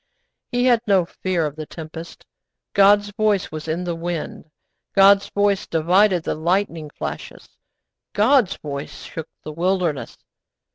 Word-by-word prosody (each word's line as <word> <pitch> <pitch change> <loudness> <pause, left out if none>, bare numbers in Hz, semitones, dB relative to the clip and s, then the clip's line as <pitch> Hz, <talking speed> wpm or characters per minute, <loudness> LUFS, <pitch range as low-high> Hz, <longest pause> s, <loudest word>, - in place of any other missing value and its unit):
He 245 0 +1
had 240 -3 +4
no 190 -4 +4
fear 175 -1 -2
of 150 -1 -4
the 155 -1 -7
tempest. 165 +1 -9 0.5
God's 205 +1 +5
voice 210 -3 0
was 155 0 -7
in 165 +3 -2
the 175 -1 -2
wind; 165 -1 -5 0.5
God's 195 0 +6
voice 205 -1 +1
divided 180 +3 +3
the - - -1
lightning 170 -1 -1
flashes; - - -7 0.6
God's 225 0 +3
voice 140 -1 -7
shook 160 -1 -7
the 155 - -6
wilderness. 175 -2 -1
180 Hz, 135 wpm, -21 LUFS, 160-200 Hz, 0.6 s, God's